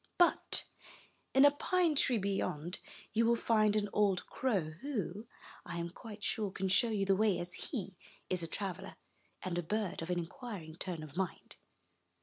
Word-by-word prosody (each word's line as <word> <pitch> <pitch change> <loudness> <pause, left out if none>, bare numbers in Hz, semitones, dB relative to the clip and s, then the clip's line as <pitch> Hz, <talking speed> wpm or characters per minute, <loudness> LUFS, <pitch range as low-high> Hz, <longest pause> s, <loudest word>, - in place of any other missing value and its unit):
But 350 -1 +3 0.7
in 270 +2 +7
a 285 - +8
pine 345 +3 +2
tree 265 -4 +4
beyond, 185 -4 -1 0.3
you 230 - +4
will 235 - +5
find 215 -2 +3
an 210 -1 +2
old 200 -3 +3
crow, 200 -12 0
who, 220 - -3 0.4
I 170 -1 -5
am 170 0 -3
quite 210 +2 -10
sure, 210 -2 0
can 190 0 -2
show 185 +6 +4
you 205 -3 +1
the 195 0 +4
way, 205 -1 +3
as 175 0 -4
he 200 -8 -5 0.3
is 185 -2 0
a 165 - -2
traveler, 190 +1 -4 0.5
and 175 -1 -1
a - - +1
bird 205 +2 -2
of 165 - -5
an 180 - +1
inquiring 175 -2 -6
turn 175 -4 -4
of 155 -1 -10
mind." 190 -1 -3
195 Hz, 175 wpm, -34 LUFS, 175-225 Hz, 0.7 s, a